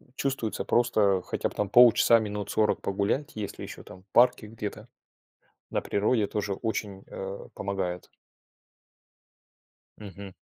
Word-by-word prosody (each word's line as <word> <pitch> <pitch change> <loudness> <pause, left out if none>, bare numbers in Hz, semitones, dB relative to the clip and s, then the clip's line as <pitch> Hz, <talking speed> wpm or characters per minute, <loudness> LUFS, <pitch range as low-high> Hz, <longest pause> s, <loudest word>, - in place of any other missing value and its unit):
чувствуется 135 -6 -2
просто 105 -6 +2
хотя - - -2
бы - - -14
там 105 -1 -2
полчаса, 120 0 +7
минут 105 -2 -3
40 110 -1 +1
погулять, 100 +9 -1
если 105 -2 -6
еще - - -8
там, 95 - -13
в 95 - -33
парке 120 -3 +4
где-то. 105 +1 -7 0.8
На - - 0
природе 105 +1 +1
тоже 100 0 -3
очень, 100 -2 -4
э, 95 +1 -7
помогает. 95 -3 -4 1.9
Мгм. 100 -2 -10
105 Hz, 125 wpm, -27 LUFS, 100-115 Hz, 1.9 s, полчаса